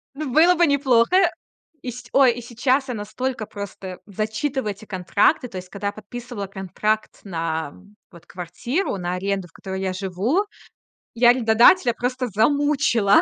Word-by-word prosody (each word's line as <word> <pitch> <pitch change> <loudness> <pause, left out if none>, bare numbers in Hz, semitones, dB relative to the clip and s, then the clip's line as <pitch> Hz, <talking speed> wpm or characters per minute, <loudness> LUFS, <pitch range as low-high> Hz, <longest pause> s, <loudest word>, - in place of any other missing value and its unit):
Н 290 -2 -4
было 335 +6 +6
бы 345 0 +4
неплохо. 280 +6 +3 0.5
И 250 - -5
се 245 +1 -10
ой, 270 -2 +6
и 245 - -7
сейчас 250 +4 0
я 250 - -3
настолько 220 +3 -4
просто 200 -3 -8
зачитываю 215 +4 -2
эти 205 +2 -11
контракты. 200 - +1
То 190 - -7
есть, 180 0 -8
когда 200 +1 -4
я 200 - -2
подписывала 215 0 -7
контракт 200 +3 -2
на, 165 -5 -3 0.4
вот, 170 -3 -16
квартиру, 195 - -3
на 180 -1 -3
аренду, 195 0 -2
в - - -27
которой 190 +2 -6
я 190 -1 -1
живу, 200 - 0 0.7
я 240 +1 +5
арендодателя 240 +4 +5
просто 250 +2 -2
замучила 240 -1 +3
220 Hz, 155 wpm, -22 LUFS, 195-260 Hz, 0.7 s, было